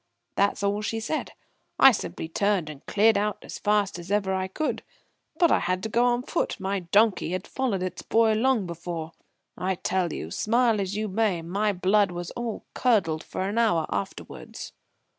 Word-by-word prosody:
That's 200 0 +1
all 200 +1 +1
she 225 +1 -2
said. 245 +8 -3 0.4
I 270 - +9
simply 195 - -4
turned 185 -2 0
and 145 -2 -13
cleared 215 +1 +4
out 210 0 -1
as - - -8
fast 205 -3 +1
as 175 +1 -10
ever 200 -2 +1
I 190 0 -1
could. 305 +11 -2 0.6
But 340 0 +4
I - - +4
had 185 +1 -1
to 220 - -2
go 235 +3 +3
on 245 0 +2
foot. - - -2
My 195 +1 -1
donkey 190 0 +2
had 185 0 -3
followed 235 -9 -1
its 185 -1 -4
boy 225 -1 +3
long 230 -1 +2
before. 170 -1 -5 0.4
I 190 +1 -1
tell 180 -1 -1
you 80 - -6
smile 230 - +2
as 195 +1 -3
you 215 0 -1
may 195 -4 0
my 200 +5 0
blood 200 +2 +2
was 175 -1 -6
all 240 -2 -5
curdled 180 -11 +1
for - - -5
an 210 +4 -1
hour 175 -9 +3
afterwards." 100 0 -6
200 Hz, 185 wpm, -26 LUFS, 180-220 Hz, 0.6 s, I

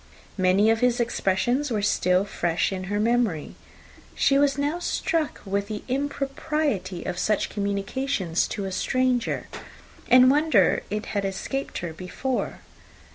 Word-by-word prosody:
Many 190 +4 +4
of 225 - +1
his 250 0 +2
expressions 240 +4 0
were 215 -4 -1
still 185 -1 +2
fresh 175 -4 -1
in 185 -1 -4
her 205 +2 -2
memory. 225 -8 0 0.6
She 275 0 +3
was 285 0 +2
now 290 +4 -1
struck 330 -3 -1
with 200 +1 -1
the 210 -1 -5
impropriety 275 - -2
of 175 - -4
such 210 +2 +1
communications 200 -2 -1
to 200 - -4
a 190 - -4
stranger, 255 +3 0 0.6
and 255 +1 +7
wondered 285 - +3
it 210 +1 -3
had 200 -1 0
escaped 195 +8 -3
her 165 - -5
before. 190 +10 -3
215 Hz, 135 wpm, -25 LUFS, 190-270 Hz, 0.6 s, and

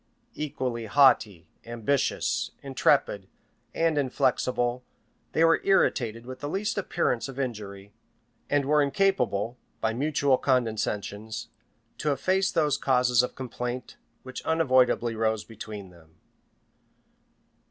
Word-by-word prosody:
Equally 125 -6 -3
haughty, 105 - +4 0.2
ambitious, 120 +4 -1
intrepid, 135 -7 +1 0.4
and 165 -2 +1
inflexible, 125 -2 0 0.5
they 160 - +3
were 165 0 +4
irritated 120 - +1
with 130 0 -8
the 145 - -4
least 210 +5 -1
appearance 125 -9 -1
of 135 0 -8
injury, 105 -6 -5 0.6
and 145 -1 +2
were 150 +1 +3
incapable, 140 - +1 0.2
by 110 0 0
mutual 140 0 +1
condescensions, 110 -3 -1 0.5
to 150 - 0
efface 190 +8 +1
those 150 -4 +2
causes 125 -2 +3
of 125 - -4
complaint 125 -1 -5 0.3
which 130 0 -7
unavoidably 130 -7 +2
rose 110 -1 0
between 105 -4 -9
them. 80 -2 -20
125 Hz, 110 wpm, -27 LUFS, 110-145 Hz, 0.6 s, haughty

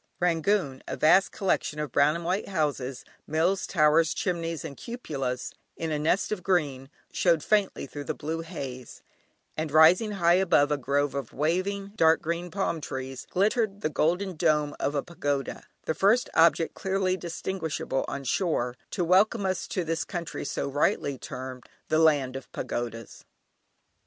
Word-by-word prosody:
Rangoon, 170 -4 +1
a - - -4
vast 185 +5 +5
collection 185 -5 -1
of 150 -4 -3
brown 145 +4 +4
and 170 0 -5
white 185 +4 -1
houses, 145 -7 -2 0.2
mills, 170 +5 +1
towers, 155 -1 +3
chimneys, 165 -3 -2
and 140 - -6
cupolas, 140 - -4 0.2
in 165 -1 -3
a 150 - 0
nest 170 +8 +1
of 210 -4 -2
green, 145 -8 0 0.2
showed 170 -4 +2
faintly 205 -7 +1
through 145 +1 -8
the - - -3
blue 160 +2 -4
haze; 135 -7 -8 0.5
and 155 -1 -3
rising 170 +8 +6
high 170 -3 +3
above 150 -6 +3
a 150 - +2
grove 140 +1 0
of 140 -5 -5
waving 185 +7 -1
dark 160 -4 +5
green 170 +2 -3
palm 180 -3 -2
trees, 130 -2 -6
glittered 205 +1 +1
the 155 - 0
golden 180 +5 0
dome 150 -2 +1
of 145 - -1
a 140 - 0
pagoda, 145 -5 -3 0.2
the - - 0
first 210 +8 +3
object 165 0 +4
clearly 190 -1 0
distinguishable 170 -5 -3
on 140 - -4
shore, 125 -4 0
to 180 - -1
welcome 195 +4 +3
us 185 -2 -1
to 180 - -2
this 165 0 -1
country 170 -3 -5
so - - -3
rightly 140 0 +1
termed 130 -1 -7 0.3
"The 155 - +3
Land 145 -5 +3
of 135 - -8
Pagodas." 115 -2 -5
160 Hz, 160 wpm, -27 LUFS, 145-185 Hz, 0.5 s, rising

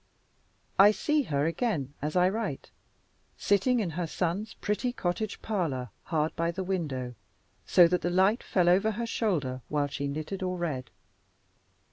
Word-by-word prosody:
I 200 +1 +9
see 300 +8 +1
her 145 - 0
again, 165 - -1
as 150 +3 -3
I 180 0 +5
write, 200 -7 -3 0.7
sitting 235 +5 +2
in 190 -7 -1
her 170 +1 -3
son's 180 +6 -2
pretty 215 +4 -1
cottage 200 -1 -3
parlor, 150 - -2
hard 155 -1 0
by 165 0 0
the 185 +3 -3
window, 145 -10 -2 0.5
so 175 -2 +7
that 180 +1 0
the 175 - 0
light 190 +5 +3
fell 180 -2 +1
over 190 +5 +4
her 235 +3 -3
shoulder 155 - -1
while 145 -1 +1
she 140 0 -3
knitted 155 +7 -4
or 185 -1 -2
read. 145 -8 -3
180 Hz, 155 wpm, -29 LUFS, 150-205 Hz, 0.7 s, I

